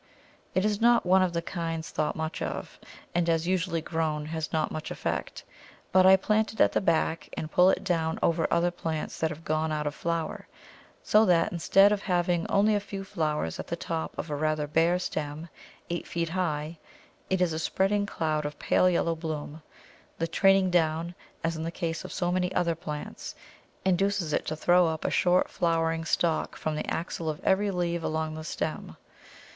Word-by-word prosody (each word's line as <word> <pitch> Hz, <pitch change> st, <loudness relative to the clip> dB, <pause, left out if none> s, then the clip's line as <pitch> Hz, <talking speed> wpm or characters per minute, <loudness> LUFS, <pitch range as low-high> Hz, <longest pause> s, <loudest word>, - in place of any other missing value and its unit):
It 185 Hz, -, +2 dB
is 210 Hz, 0 st, 0 dB
not 240 Hz, -2 st, +5 dB
one 185 Hz, +1 st, +5 dB
of 185 Hz, -1 st, +2 dB
the 170 Hz, -1 st, -2 dB
kinds 165 Hz, -2 st, -4 dB
thought 155 Hz, -, -1 dB
much 160 Hz, 0 st, -4 dB
of, -, -, -5 dB, 0.3 s
and 170 Hz, -1 st, +1 dB
as 165 Hz, 0 st, +1 dB
usually 180 Hz, -2 st, 0 dB
grown 155 Hz, -2 st, -2 dB
has 160 Hz, 0 st, -4 dB
not 160 Hz, -1 st, 0 dB
much 155 Hz, -, -5 dB
effect; -, -, -4 dB, 0.5 s
but 185 Hz, 0 st, +6 dB
I 190 Hz, -, +9 dB
plant 215 Hz, +3 st, +1 dB
it -, -, -14 dB
at -, -, +5 dB
the -, -, +1 dB
back 165 Hz, -2 st, 0 dB
and 155 Hz, -, -4 dB
pull 180 Hz, +1 st, +6 dB
it -, -, +1 dB
down 165 Hz, -4 st, 0 dB
over 165 Hz, -1 st, +2 dB
other 170 Hz, +1 st, +2 dB
plants 160 Hz, -3 st, -4 dB
that 160 Hz, -, +1 dB
have 155 Hz, +1 st, -9 dB
gone 155 Hz, +1 st, 0 dB
out 150 Hz, -1 st, -2 dB
of 145 Hz, -, -1 dB
flower, 165 Hz, 0 st, -3 dB, 0.6 s
so 215 Hz, +1 st, +5 dB
that 175 Hz, -2 st, +3 dB
instead 195 Hz, +4 st, +5 dB
of 205 Hz, -1 st, 0 dB
having 175 Hz, -3 st, 0 dB
only 210 Hz, +2 st, +3 dB
a 205 Hz, -, +2 dB
few 200 Hz, -1 st, -6 dB
flowers 150 Hz, -, -2 dB
at -, -, -5 dB
the 170 Hz, -, -2 dB
top 165 Hz, -1 st, -4 dB
of 160 Hz, -, -5 dB
a -, -, -1 dB
rather 155 Hz, 0 st, 0 dB
bare 165 Hz, +4 st, +2 dB
stem 155 Hz, -2 st, -4 dB, 0.4 s
eight 175 Hz, -, -3 dB
feet 170 Hz, -1 st, -2 dB
high, 160 Hz, -3 st, -2 dB, 0.5 s
it 190 Hz, -, +1 dB
is 180 Hz, -3 st, +2 dB
a 160 Hz, -, -2 dB
spreading 200 Hz, +4 st, +1 dB
cloud 155 Hz, -4 st, -1 dB
of 145 Hz, 0 st, -5 dB
pale 185 Hz, -, +3 dB
yellow 170 Hz, -1 st, +1 dB
bloom; 155 Hz, -1 st, -5 dB, 0.6 s
the 165 Hz, -, 0 dB
training 195 Hz, +2 st, +4 dB
down, 165 Hz, 0 st, +1 dB, 0.3 s
as 165 Hz, 0 st, 0 dB
in 160 Hz, -, -5 dB
the 165 Hz, -, -2 dB
case 165 Hz, -2 st, -3 dB
of -, -, -8 dB
so 175 Hz, -2 st, -1 dB
many 180 Hz, 0 st, 0 dB
other 170 Hz, -1 st, +2 dB
plants, 150 Hz, -2 st, -7 dB, 0.5 s
inducing 190 Hz, -3 st, +1 dB
it -, -, -2 dB
to 155 Hz, -, -2 dB
throw 175 Hz, +2 st, +4 dB
up 160 Hz, -1 st, -3 dB
a -, -, +1 dB
short 180 Hz, 0 st, +3 dB
flowering 165 Hz, -1 st, 0 dB
stalk 170 Hz, -1 st, 0 dB
from 155 Hz, -1 st, -2 dB
the -, -, -2 dB
axil 165 Hz, -1 st, -3 dB
of 150 Hz, -, -4 dB
every 200 Hz, +2 st, +2 dB
leaf 175 Hz, -2 st, -1 dB
along 160 Hz, -1 st, -2 dB
the 155 Hz, 0 st, -6 dB
stem. 155 Hz, -, -4 dB
165 Hz, 195 wpm, -28 LUFS, 160-180 Hz, 0.6 s, I